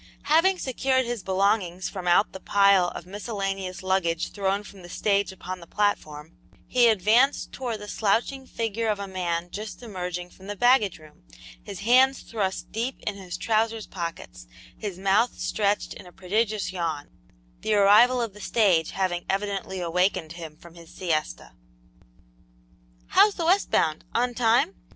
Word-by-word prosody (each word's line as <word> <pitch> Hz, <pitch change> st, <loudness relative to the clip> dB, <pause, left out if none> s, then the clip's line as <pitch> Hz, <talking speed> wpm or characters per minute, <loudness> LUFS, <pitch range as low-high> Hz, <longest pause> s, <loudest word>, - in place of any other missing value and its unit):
Having 330 Hz, +6 st, +4 dB
secured 260 Hz, -2 st, 0 dB
his 240 Hz, -2 st, -3 dB
belongings 190 Hz, -2 st, 0 dB
from 185 Hz, -3 st, -6 dB
out 175 Hz, +4 st, +4 dB
the 190 Hz, -, -9 dB
pile 195 Hz, -2 st, +4 dB
of -, -, -7 dB
miscellaneous 195 Hz, -2 st, -4 dB
luggage 180 Hz, -3 st, 0 dB
thrown 200 Hz, 0 st, -1 dB
from 200 Hz, -2 st, -13 dB
the 175 Hz, -, -12 dB
stage 200 Hz, +2 st, 0 dB
upon 185 Hz, 0 st, -7 dB
the 170 Hz, -, -13 dB
platform, 160 Hz, -7 st, -2 dB, 0.3 s
he 245 Hz, -1 st, +4 dB
advanced 225 Hz, +6 st, +3 dB
towards 240 Hz, -4 st, -4 dB
the 210 Hz, 0 st, -10 dB
slouching 235 Hz, +6 st, 0 dB
figure 225 Hz, 0 st, -2 dB
of 210 Hz, -1 st, +1 dB
a 200 Hz, -, -5 dB
man 175 Hz, -2 st, -3 dB
just 215 Hz, +3 st, -7 dB
emerging 180 Hz, -4 st, -5 dB
from 190 Hz, -, -15 dB
the 205 Hz, -, -4 dB
baggage 245 Hz, -3 st, +3 dB
room, 155 Hz, -1 st, -18 dB, 0.4 s
his -, -, -8 dB
hands 255 Hz, +5 st, +4 dB
thrust 195 Hz, -4 st, -3 dB
deep 235 Hz, +4 st, -3 dB
in 210 Hz, -, -1 dB
his 190 Hz, -3 st, -7 dB
trousers 225 Hz, 0 st, 0 dB
pockets, 165 Hz, -, -7 dB, 0.3 s
his 200 Hz, -4 st, -6 dB
mouth 200 Hz, +5 st, +2 dB
stretched 205 Hz, -1 st, 0 dB
in -, -, -12 dB
a -, -, -13 dB
prodigious 205 Hz, +3 st, -1 dB
yawn, 165 Hz, -5 st, -3 dB, 0.5 s
the 215 Hz, -, 0 dB
arrival 210 Hz, +5 st, +6 dB
of 225 Hz, -4 st, -5 dB
the 210 Hz, -, -13 dB
stage 190 Hz, -9 st, +2 dB
having 180 Hz, -2 st, -2 dB
evidently 195 Hz, -1 st, -2 dB
awakened 175 Hz, -1 st, 0 dB
him 165 Hz, -3 st, -9 dB
from 170 Hz, 0 st, -15 dB
his 170 Hz, -1 st, -14 dB
siesta. 155 Hz, -, -3 dB, 1.6 s
"How's 415 Hz, -1 st, +5 dB
the 335 Hz, -, -2 dB
west 375 Hz, +4 st, +3 dB
bound 155 Hz, -1 st, +1 dB
on 245 Hz, +1 st, +1 dB
time?" 245 Hz, +9 st, +2 dB
200 Hz, 160 wpm, -25 LUFS, 180-225 Hz, 1.6 s, arrival